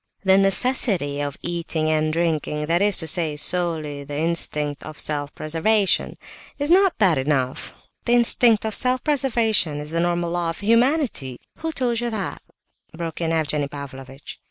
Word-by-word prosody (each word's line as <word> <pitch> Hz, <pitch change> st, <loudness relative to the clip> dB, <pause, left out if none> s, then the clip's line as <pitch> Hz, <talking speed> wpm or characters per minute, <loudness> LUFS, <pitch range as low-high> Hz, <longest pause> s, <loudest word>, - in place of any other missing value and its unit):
"The 190 Hz, -1 st, +5 dB
necessity 195 Hz, -, +1 dB
of 145 Hz, -1 st, -4 dB
eating 170 Hz, -2 st, -2 dB
and 155 Hz, 0 st, +1 dB
drinking, 155 Hz, -2 st, -1 dB
that 170 Hz, +3 st, +1 dB
is 205 Hz, -1 st, +3 dB
to 160 Hz, -, +1 dB
say, 160 Hz, -2 st, +2 dB
solely 155 Hz, -4 st, -1 dB
the 145 Hz, +1 st, -6 dB
instinct 150 Hz, -3 st, 0 dB
of 155 Hz, 0 st, -9 dB
self 145 Hz, -1 st, -2 dB
preservation..." 190 Hz, +6 st, +1 dB, 0.4 s
"Is 290 Hz, +2 st, -1 dB
not 380 Hz, 0 st, +4 dB
that 180 Hz, -9 st, +3 dB
enough? 130 Hz, -2 st, -2 dB, 0.3 s
The 240 Hz, -, +2 dB
instinct 235 Hz, -2 st, +4 dB
of 220 Hz, -, -2 dB
self 255 Hz, +2 st, 0 dB
preservation 230 Hz, -, +1 dB
is 150 Hz, +1 st, -7 dB
the 165 Hz, -, -1 dB
normal 175 Hz, 0 st, -1 dB
law 175 Hz, -1 st, -1 dB
of 165 Hz, -, -6 dB
humanity..." 230 Hz, -, +1 dB, 0.2 s
"Who 325 Hz, 0 st, -3 dB
told 245 Hz, -6 st, -1 dB
you 240 Hz, 0 st, -2 dB
that?" 215 Hz, -4 st, -4 dB, 0.5 s
broke 165 Hz, -1 st, -6 dB
in 165 Hz, -1 st, 0 dB
Evgenie 150 Hz, -3 st, 0 dB
Pavlovitch. 135 Hz, -1 st, -10 dB
170 Hz, 160 wpm, -22 LUFS, 150-220 Hz, 0.5 s, The